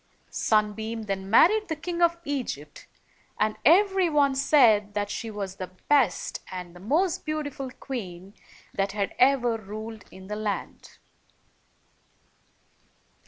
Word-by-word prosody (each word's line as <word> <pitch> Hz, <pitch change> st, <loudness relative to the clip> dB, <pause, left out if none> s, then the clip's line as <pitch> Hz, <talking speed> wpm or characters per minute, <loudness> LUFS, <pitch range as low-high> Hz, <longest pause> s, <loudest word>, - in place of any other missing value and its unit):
Sunbeam 220 Hz, +1 st, 0 dB
then 195 Hz, -2 st, -4 dB
married 420 Hz, -, +5 dB
the 320 Hz, -, -2 dB
King 340 Hz, +2 st, -4 dB
of 340 Hz, 0 st, +4 dB
Egypt, 245 Hz, -, -5 dB, 0.5 s
and 215 Hz, 0 st, +1 dB
every 380 Hz, +3 st, +5 dB
one 285 Hz, -3 st, +3 dB
said 230 Hz, -7 st, +4 dB
that 205 Hz, 0 st, -1 dB
she 230 Hz, -, -4 dB
was 200 Hz, -3 st, -5 dB
the 185 Hz, -, -6 dB, 0.2 s
best 285 Hz, -4 st, +2 dB
and 180 Hz, -2 st, -7 dB
most 335 Hz, +6 st, +1 dB
beautiful 300 Hz, -3 st, -4 dB
queen 195 Hz, -8 st, -7 dB, 0.4 s
that 195 Hz, 0 st, -1 dB
had 200 Hz, -1 st, -2 dB
ever 250 Hz, -3 st, +4 dB
ruled 215 Hz, +1 st, -8 dB
in 190 Hz, 0 st, -13 dB
the 210 Hz, +2 st, -5 dB
land. 210 Hz, -1 st, -5 dB
225 Hz, 120 wpm, -26 LUFS, 205-290 Hz, 0.5 s, married